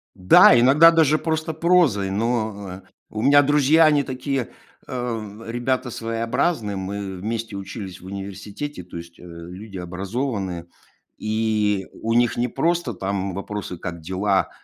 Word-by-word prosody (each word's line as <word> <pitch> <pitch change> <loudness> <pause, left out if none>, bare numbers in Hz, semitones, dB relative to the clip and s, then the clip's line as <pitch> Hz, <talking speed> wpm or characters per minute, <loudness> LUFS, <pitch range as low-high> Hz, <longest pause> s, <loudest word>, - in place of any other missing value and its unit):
Да, 95 +5 +7
иногда 145 +7 +7
даже 155 -2 +4
просто 160 0 -2
прозой, 160 - +2
но, 105 -3 -2
э - - -26 0.2
У 110 - -5
меня 145 +2 +6
друзья 150 +3 +4
они 150 -2 +4
такие, 130 -1 -3 0.4
э, 115 -4 -5
ребята 125 +2 -1
своеобразные. 115 - -1
Мы 95 0 -5
вместе 110 +2 -4
учились 95 -1 -7
в - - -14
университете, 100 +7 -7
то 85 - -10
есть, 85 0 -11
э, - - -14
люди 90 +4 -9
образованные. 95 0 -4 0.5
И 110 -2 0
у 115 +1 -1
них 120 -1 +3
не 120 +1 0
просто 165 +1 0
там 95 0 -3
вопросы: 100 -2 -5
"Как 85 -1 -6
дела? 95 +4 0
110 Hz, 140 wpm, -22 LUFS, 95-130 Hz, 0.5 s, Да